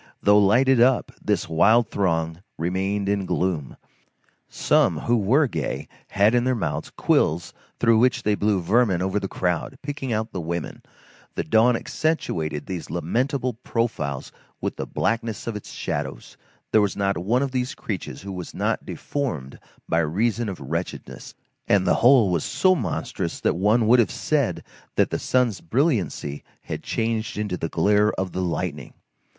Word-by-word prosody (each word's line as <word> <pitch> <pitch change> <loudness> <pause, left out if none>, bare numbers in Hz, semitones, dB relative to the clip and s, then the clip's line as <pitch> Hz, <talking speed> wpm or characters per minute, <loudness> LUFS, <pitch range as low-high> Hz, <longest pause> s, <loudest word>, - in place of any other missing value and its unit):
Though 105 0 +6
lighted 120 +5 +4
up, 125 0 +3
this - - 0
wild 105 +8 +4
throng 80 -3 0 0.2
remained 95 +4 -1
in 100 -2 0
gloom. 85 -7 -1 0.7
Some, - - +2
who 120 - +2
were 120 +8 +3
gay, 80 - -3 0.2
had 100 +3 +3
in 120 -1 +3
their 130 0 +1
mouths 110 - -3
quills 80 +3 +1 0.3
through 115 -2 +4
which 125 0 +2
they 105 - +2
blew 100 -2 +1
vermin 95 -1 +2
over 95 +2 0
the 100 - -3
crowd, 90 +8 -2
picking 140 -3 -4
out 110 +1 -1
the 90 - -4
women; 85 0 -4 0.5
the - - -1
dawn 115 +2 +4
accentuated 80 - -2
these 90 -3 -5
lamentable 125 - -1
profiles 75 - -2 0.3
with - - -3
the - - -5
blackness 115 -2 -2
of 115 - -3
its 105 - -8
shadows; - - -4 0.4
there 110 - +5
was 100 -2 0
not 100 -1 +1
one 115 +9 +1
of 135 - -2
these 125 +1 -2
creatures 95 -3 -5
who 100 - -6
was 90 -2 -7
not - - -1
deformed 80 - -4 0.3
by 80 - +2
reason 105 +8 0
of 95 - -6
wretchedness; 80 +6 -5 0.3
and 100 -2 +3
the 90 - +4
whole 120 -5 +6
was 85 -4 0
so 185 0 +3
monstrous 115 - -3
that - - +1
one 105 +6 +3
would 120 +3 +6
have 110 -6 +3
said - - -1 0.3
that - - +2
the - - -1
sun's 125 -6 +1
brilliancy 100 - -1 0.2
had - - -5
been - - -20
changed 115 -1 -1
into 105 -3 -2
the 80 -2 -3
glare 105 +5 +3
of 95 -1 -3
the 95 - -3
lightning. 85 -5 -3
105 Hz, 165 wpm, -24 LUFS, 90-120 Hz, 0.7 s, Though